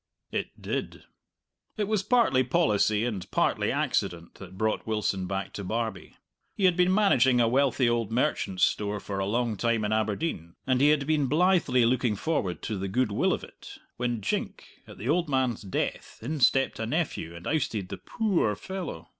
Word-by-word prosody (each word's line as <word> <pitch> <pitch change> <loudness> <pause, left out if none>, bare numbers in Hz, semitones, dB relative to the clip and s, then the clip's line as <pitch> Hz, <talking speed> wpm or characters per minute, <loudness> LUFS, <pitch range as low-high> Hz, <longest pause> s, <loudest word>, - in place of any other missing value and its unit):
It - - -4
did. - - -4 0.7
It 215 - 0
was 215 -2 +1
partly 210 - +3
policy 110 - +2
and 105 -7 -4
partly - - +1
accident 85 -1 -1
that 95 -1 -11
brought 110 +2 -1
Wilson 100 -4 -1
back 95 0 -4
to 100 - -5
Barbie. 110 +3 -4 0.4
He 195 - +1
had 180 -2 +5
been 180 +1 +3
managing 135 - +4
a 115 - +4
wealthy 130 0 +2
old 115 -2 0
merchant's 100 -5 0
store 105 0 +1
for 100 0 -5
a 95 - -1
long 115 0 0
time 115 0 +1
in 105 - 0
Aberdeen, 105 - -2
and 130 -1 +2
he 145 - +6
had 150 -2 +2
been 150 -2 +1
blithely 155 -6 +3
looking 120 -2 +1
forward 100 - -2
to 105 -3 -3
the 100 - -3
goodwill 105 +1 +1
of - - -2
it, - - -12 0.2
when 120 -2 -1
jink, - - -3 0.2
at - - -12
the 110 - -6
old 170 +2 +1
man's 130 -4 0
death, 95 - -3
in 150 +5 -3
stepped 135 +1 +3
a 110 - -2
nephew, 135 - -2
and 85 - -10
ousted 110 -11 -1
the - - -5
poo 215 -6 -1
oor 105 -1 +1
fellow. 170 - -6
120 Hz, 185 wpm, -27 LUFS, 105-150 Hz, 0.7 s, he